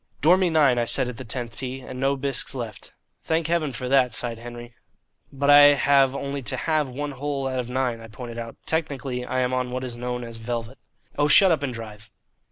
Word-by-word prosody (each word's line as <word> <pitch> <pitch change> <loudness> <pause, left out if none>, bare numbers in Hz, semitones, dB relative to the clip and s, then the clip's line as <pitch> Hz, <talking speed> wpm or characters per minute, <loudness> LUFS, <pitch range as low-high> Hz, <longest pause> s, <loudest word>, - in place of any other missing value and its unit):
"Dormy 180 +4 +4
nine," 145 -6 +4
I 120 - +1
said 130 +2 +1
at 120 - -8
the 130 - -7
tenth 120 0 -6
tee, 130 0 -5
"and 125 0 -8
no 135 +1 +2
bisques 135 0 -2
left." 115 -5 -7 0.3
"Thank 160 0 0
Heaven 165 -3 0
for 125 0 -5
that," 125 -3 +3
sighed 115 -2 -4
Henry. 120 0 -9 0.6
"But 140 +1 +2
I 145 0 +9
have 135 -1 +4
only 140 0 -4
to 130 +1 -3
halve 155 -2 0
one 145 +3 -4
hole 140 0 -3
out 130 -1 -2
of 125 -1 -4
nine," 125 -2 -1
I 115 - -10
pointed 120 +1 -8
out. 115 0 -7
"Technically 140 -5 -2
I 130 +1 -1
am 125 0 0
on 130 -1 -1
what 130 +1 -4
is 120 -2 -5
known 125 0 -4
as 115 -1 -8
velvet." 115 +2 -5 0.4
"Oh, 145 - +4
shut 190 +5 +7
up 160 -4 +1
and 140 -2 -2
drive." 110 -2 -9
130 Hz, 220 wpm, -24 LUFS, 120-140 Hz, 0.6 s, I